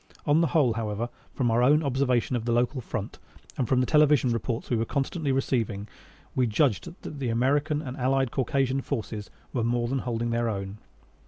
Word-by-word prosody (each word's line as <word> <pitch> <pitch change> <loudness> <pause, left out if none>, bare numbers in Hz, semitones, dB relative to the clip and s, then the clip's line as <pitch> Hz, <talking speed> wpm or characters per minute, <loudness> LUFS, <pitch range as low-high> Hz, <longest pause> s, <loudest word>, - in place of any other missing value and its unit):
On 150 +2 +4
the 165 - +3
whole, 135 -5 +3
however, 110 +1 -3 0.3
from 120 -4 +1
our 115 +2 +3
own 150 +5 +5
observation 130 -2 +1
of 115 -2 -2
the 120 - 0
local 120 +2 +1
front 110 -3 -5 0.4
and 125 - -1
from 130 -1 +3
the - - +2
television 150 -3 +4
reports 115 0 -2
we - - +3
were 115 - +1
constantly 140 - -1
receiving, 115 -6 -1 0.5
we 125 -2 +2
judged 115 +1 +1
that 145 - -7
the 130 -3 -1
American 145 +6 +1
and 130 -3 -5
Allied 130 0 +1
Caucasian 135 0 0
forces 110 -6 -4 0.2
were 120 - 0
more 120 +1 +1
than 135 +2 -1
holding 120 -1 -2
their 115 0 +1
own. 100 0 -4
125 Hz, 190 wpm, -27 LUFS, 115-135 Hz, 0.5 s, own